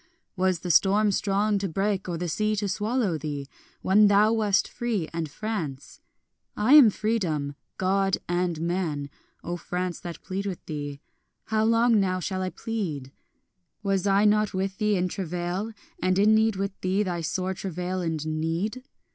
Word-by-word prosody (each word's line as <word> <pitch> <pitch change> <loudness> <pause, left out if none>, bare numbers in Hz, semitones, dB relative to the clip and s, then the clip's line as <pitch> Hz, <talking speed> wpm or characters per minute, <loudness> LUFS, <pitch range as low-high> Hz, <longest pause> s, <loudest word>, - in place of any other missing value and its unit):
Was 185 -2 +1
the 180 - -1
storm 205 +5 +4
strong 200 +1 +1
to 195 -1 -2
break 195 +2 -1
or 170 - -2
the 175 +1 -3
sea 215 +7 0
to 205 0 -1
swallow 210 -3 0
thee, 145 -2 -4 0.4
When 205 +3 +5
thou 205 +2 +5
wast 210 -3 +2
free 225 -9 -2
and 165 -2 -3
France? 160 -7 -5 0.6
I 220 +7 +4
am 290 -7 +10
Freedom, 180 -10 -1 0.2
God 195 0 +1
and 175 -2 0
man, 165 -5 -2 0.3
O 175 +1 -3
France, 180 +1 -3
that 170 -1 -8
plead 195 +2 -3
with 185 -3 -6
thee; 145 -2 -5 0.4
How 220 0 +1
long 230 0 +4
now 185 -2 +1
shall 185 +1 -3
I 185 - -1
plead? 180 - -4 0.7
Was 195 -1 0
I 200 +1 +4
not 210 -1 +3
with 190 +1 -2
thee 210 -1 +2
in 180 -1 +1
travail, 180 +3 -3 0.3
and 185 0 +2
in 210 +2 +5
need 220 -1 +3
with 195 +1 -2
thee, 190 +3 +1
Thy 175 -3 -2
sore 185 +3 -2
travail 185 0 -3
and 160 -3 -2
need? 165 +10 -2
190 Hz, 165 wpm, -26 LUFS, 175-210 Hz, 0.7 s, am